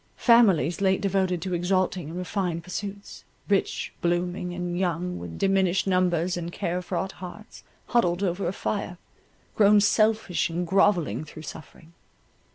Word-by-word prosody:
Families 200 - +4
late 190 -1 +3
devoted 190 -3 0
to 185 -1 -3
exalting 180 -2 0
and 170 - -6
refined 180 -2 -2
pursuits, 200 +2 -7 0.2
rich, 200 -1 0
blooming, 175 +1 -1
and 175 0 -4
young, 180 0 -1
with 85 -1 -8
diminished 195 -1 +2
numbers 180 -2 +1
and 170 -1 -4
care 175 +1 -2
fraught 190 +1 -3
hearts, 190 +5 -11 0.2
huddled 195 -6 +1
over 180 0 -1
a - - 0
fire, 195 -2 -3 0.6
grown 210 0 +6
selfish 215 -3 +2
and 175 +2 -2
grovelling 185 -3 +2
through 155 0 -11
suffering. 160 +1 -11
180 Hz, 140 wpm, -26 LUFS, 175-195 Hz, 0.6 s, grown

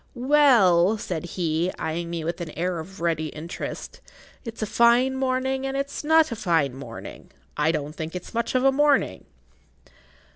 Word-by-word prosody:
"Well," 240 -9 +4
said 175 -5 -4
he, 170 +1 0
eying 165 +2 -3
me 170 -1 -4
with 170 +2 -3
an 170 - -5
air 175 0 -1
of 180 +3 -10
ready 165 -2 0
interest, 155 +3 -7 0.4
"it's 230 -2 -6
a - - +1
fine 235 +4 +3
morning 265 0 -1
and 270 0 -3
it's 275 +2 -4
not 320 -1 +4
a - - -2
fine 165 - +1
morning. 125 -4 -10 0.3
I 150 +2 +2
don't 150 -2 -3
think 160 +2 -6
it's 180 - -7
much 235 +2 -2
of 255 - +2
a 270 - +5
morning." 290 +1 +2
185 Hz, 170 wpm, -24 LUFS, 165-260 Hz, 0.4 s, a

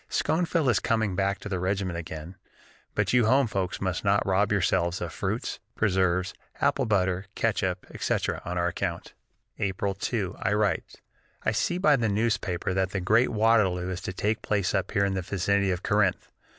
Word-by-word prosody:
Schoenfield 165 -2 +1
is 105 -6 +3
coming 110 -4 0
back 100 +1 +1
to - - -8
the 95 -3 -2
regiment 95 -1 -1
again, 80 +1 -7 0.6
but - - +1
you 120 -3 +4
home 135 +3 +4
folks 95 -4 -2
must 95 -2 -2
not 100 0 +2
rob 95 +2 +2
yourselves 85 -2 +1
of 85 -2 -5
fruits, 105 +6 -3 0.2
preserves, 95 -3 +1 0.3
apple - - +1
butter, 95 -2 +1
catsup, 95 -5 0
etc., - - -1
on 90 +1 -4
our 85 0 +1
account!" - - -4 0.5
On - - +1
April 100 +1 -1
2 100 -1 -3
I 105 - +1
write: 105 -5 -1 0.4
"I - - +2
see 175 - 0
by 155 -6 +4
the 115 -3 0
newspapers 100 -4 0
that 95 0 +1
the 95 - -2
great 110 +7 +3
Waterloo 105 -5 +2
is 90 0 -4
to 90 - -4
take 105 +4 -1
place 100 -4 0
up 95 -2 0
here 100 -2 +2
in 100 - 0
the 95 - -1
vicinity 100 +2 0
of 90 0 -2
Corinth. 100 -3 +1
100 Hz, 185 wpm, -27 LUFS, 90-105 Hz, 0.6 s, you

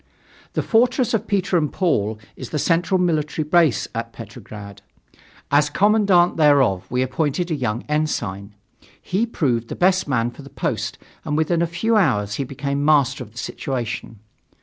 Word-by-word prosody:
The - - -1
Fortress 240 +1 +2
of 220 0 0
Peter 190 -3 +1
and 150 -2 -1
Paul 110 - 0 0.2
is 130 - -8
the 155 - -2
central 175 +4 +1
military 155 -3 0
base 165 -5 +3
of 115 0 -4
Petrograd. 105 -3 -10 0.7
As 145 +1 +4
commandant 200 -1 +3
thereof 140 - +3
we 125 +1 +1
appointed 150 +6 -1
a - - +1
young 120 -4 -2
ensign. 105 -10 -2 0.4
He 210 +6 -1
proved 125 - -1
the - - -6
best 185 0 +2
man 120 -3 0
for 120 - -13
the 140 - -12
post - - -3 0.3
and 150 -1 -2
within 165 +2 +1
a 170 - +2
few 215 +7 +1
hours 105 - +2
he - - 0
became 140 +2 -3
master 140 -3 +3
of 110 - -15
the - - -17
situation. 120 -3 -4
150 Hz, 165 wpm, -21 LUFS, 120-175 Hz, 0.7 s, As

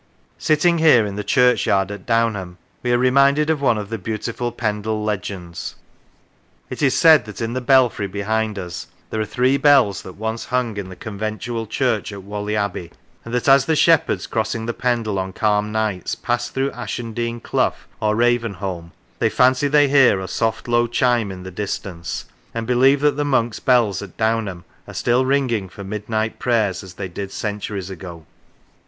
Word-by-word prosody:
Sitting 165 +2 +2
here 150 -9 +6
in 100 -1 -5
the 105 - -3
churchyard 120 -7 +2
at 100 -3 -9
Downham, 110 -6 0 0.2
we 120 - -1
are 120 - +4
reminded 140 +4 +3
of 150 -3 -1
one 125 -5 +3
of 105 -1 -5
the 115 - -3
beautiful 115 +4 -3
Pendle 110 -1 -2
legends. 90 -5 -4 1.0
It - - -5
is 135 -3 +3
said 155 -8 +6
that 105 - -9
in 115 0 -2
the 130 - -2
belfry 125 -5 +3
behind 105 +2 -2
us 90 -2 -6 0.2
there 110 - -1
are - - -1
three 125 +5 +2
bells 135 -8 +4
that 95 - -10
once 110 +2 -4
hung 125 -3 -1
in 95 -2 -5
the 95 - -9
conventual 110 +3 -4
church 115 -2 -1
at 100 -1 -8
Whalley 105 +1 -4
Abbey, 100 -5 -3 0.3
and 115 - -9
that 125 +2 -1
as 135 -1 +6
the 160 - +1
shepherds, 165 +2 +3
crossing 110 0 -2
Pendle 115 -3 -1
on 95 0 -4
calm 105 0 +1
nights, 110 -5 -1
pass 120 0 -2
through 135 +1 -1
Ashen 115 -1 -5
Dean 120 +1 -3
clough - - 0 0.2
or 105 0 +1
Ravenholme, 100 -8 -1 0.3
they 115 - +2
fancy 125 +5 +3
they 145 0 +4
hear 135 -8 +5
a 95 - -5
soft 110 +5 -2
low 120 0 +2
chime 120 -3 +1
in 90 -1 -8
the 95 - -8
distance, 90 -3 -5 0.3
and 115 0 -2
believe 130 +3 +4
that 150 -1 +2
the 145 - +1
monks' 120 -6 0
bells 115 -7 +2
at 100 -3 -10
Downham 110 -6 -1 0.2
are - - -10
still 125 +2 +2
ringing 125 -8 0
for 100 - -10
mid 105 +2 -6
night 110 0 -1
prayers 110 -6 +1
as 90 -2 -12
they 95 - -5
did 95 +2 -6
centuries 100 -3 -4
ago. 85 -3 -9
110 Hz, 185 wpm, -21 LUFS, 100-125 Hz, 1.0 s, here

